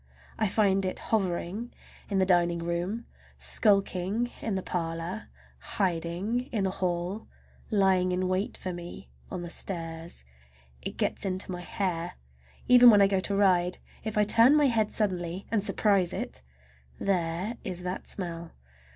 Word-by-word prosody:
I 215 - +2
find 195 -1 +3
it 185 - -2
hovering 200 +2 -1 0.4
in 200 - 0
the 190 - +4
dining 175 -2 +3
room, 175 +7 -3 0.3
skulking 200 +2 +1
in 220 -4 -2
the 190 - -2
parlor, 165 +3 -4 0.5
hiding 190 - -1
in 215 -4 0
the 190 - +1
hall, 180 +3 -2 0.4
lying 190 -3 +3
in 185 +1 0
wait 185 +3 -1
for 185 - -4
me 175 +2 -9 0.2
on 180 -2 -5
the 175 - -6
stairs. 165 - -5 0.6
It - - -6
gets - - -1
into 185 0 -2
my 180 -1 -5
hair. 175 -2 -2 0.5
Even 245 -1 +9
when 210 -3 +7
I - - +7
go 195 -1 +2
to 200 +1 -1
ride, 180 -3 +3 0.3
if 220 -1 -3
I 210 - +5
turn 230 +6 +6
my 300 -1 +5
head 220 -3 +1
suddenly 185 -3 -1
and 225 -3 +2
surprise 200 -3 +2
it—there 65 - -4
is 180 0 -5
that 180 +1 -4
smell! 170 -3 -5
185 Hz, 150 wpm, -28 LUFS, 175-205 Hz, 0.6 s, Even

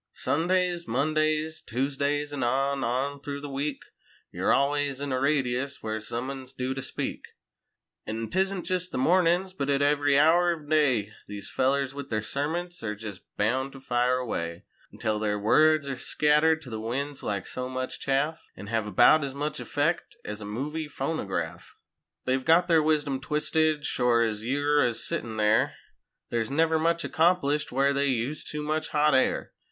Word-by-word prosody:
Sundays, 175 +2 0
Mondays, 155 +4 0
Tuesdays, 140 +3 -1
an' 145 - -3
on, 135 +3 +1
on 135 +4 -1
through 140 0 -5
the 145 - -7
week, 140 +1 -3 0.5
Yer - - -1
always 140 -1 +1
in 140 -1 -3
a 130 - 0
radius 140 -1 0
where 110 0 -2
some 120 +4 -4
un's 130 -1 -8
due 130 0 -2
to 135 - -5
speak. - - -4 0.9
An' 110 +1 -3
'tisn't 190 - 0
jest 185 0 -1
the - - -3
mornin's 180 +5 +3
but 140 -6 -3
at 140 0 +2
every 145 -1 +3
hour 170 +3 +5
ov 150 - -15
day, 130 -9 +2 0.2
These 105 -1 -8
fellers 135 0 +1
with 140 0 -7
their 110 -1 -1
sermonts 170 +8 -3
air 105 -2 -3
jest 105 -3 -8 0.2
bound 130 +6 0
to 135 - -10
fire 125 0 +1
away; 85 -9 -4 0.3
Until 110 -1 -2
their 105 -1 0
words 155 +8 +4
air 140 -1 -3
scattered 150 +4 +2
to 125 - -10
the 110 - -4
winds 135 +5 -3
like 100 -2 -3
so 125 0 -5
much 130 0 -4
chaff 145 +4 -1
An' 100 - -9
hev 110 0 -1
about 140 +9 +5
as 135 -1 -4
much 150 +2 -3
effect's 150 +4 -1 0.2
a - - -6
"movie" 145 +9 -4
phonograf. 95 - -4 0.5
They've 130 0 +1
got 165 +4 +4
their 165 -3 +5
wisdom 150 -3 +1
twisted 150 +1 +1
shore 120 -2 +2
ez 110 -2 -2
you're 145 +4 +2
a 120 -2 +1
sittin' 110 0 -2
there. 105 0 +3 0.6
There's 115 -2 -1
never 160 +3 +2
much 170 +1 +1
accomplished 160 -3 +2
where 140 +2 +2
they 140 0 +1
use 130 +3 -1
too 150 0 -5
much 155 +1 -1
hot 150 0 +3
air. 130 - +1
140 Hz, 170 wpm, -27 LUFS, 125-155 Hz, 0.9 s, hour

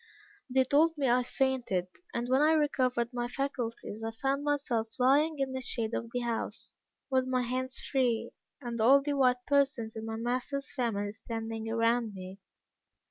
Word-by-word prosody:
They 260 +1 +4
told 305 +5 +3
me 275 -2 +1
I 245 +1 +4
fainted; 250 -8 0 0.3
and 235 +1 -2
when 260 +2 +3
I 310 +1 +5
recovered 255 -5 +1
my 240 0 -1
faculties, 240 -5 -4
I 225 - -1
found 270 +5 -1
myself 265 -6 0
lying 290 +5 +3
in 270 -1 -1
the 260 - -3
shade 230 -3 -1
of 230 - -3
the 245 - -1
house, 235 -1 -3 0.4
with 260 -1 +2
my 255 -1 +1
hands 255 +1 -2
free, 240 -4 0 0.3
and 240 -4 -4
all 275 +5 +6
the 290 0 -1
white 250 -3 +2
persons 275 -6 +1
in 220 0 -5
my 225 - -3
master's 255 +4 -3
family 205 -5 -1
standing 225 0 -5
around 230 -1 +1
me. 185 +1 -8
250 Hz, 170 wpm, -30 LUFS, 230-270 Hz, 0.4 s, all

